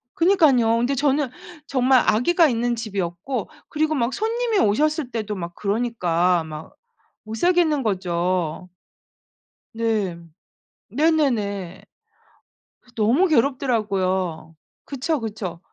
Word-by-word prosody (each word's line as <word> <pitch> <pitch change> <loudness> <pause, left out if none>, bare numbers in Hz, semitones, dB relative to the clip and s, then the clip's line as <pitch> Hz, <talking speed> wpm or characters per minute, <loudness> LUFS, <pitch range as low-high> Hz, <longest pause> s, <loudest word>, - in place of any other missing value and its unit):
그러니깐요. 295 - +4
근데 245 +4 0
저는 280 0 +1 0.4
정말 260 -1 +3
아기가 320 +11 +4
있는 240 -2 0
집이었고 200 +1 -4 0.2
그리고 310 +1 0
막 245 -1 0
손님이 455 0 0
오셨을 295 +6 +1
때도 215 -3 -3
막 170 -1 -6
그러니까 185 -6 0
막 155 0 -9 0.5
못 215 - -7
살겠는 320 -1 +2
거죠. 180 -3 -1 1.1
네. 220 -6 -1 0.7
네네네. 230 - 0 1.0
그래서 245 - -25
너무 240 - +3
괴롭더라고요. 200 - 0 0.3
그쵸, 285 +2 -2
그쵸. 205 -6 -5
230 Hz, 240 characters per minute, -22 LUFS, 190-285 Hz, 1.1 s, 그러니깐요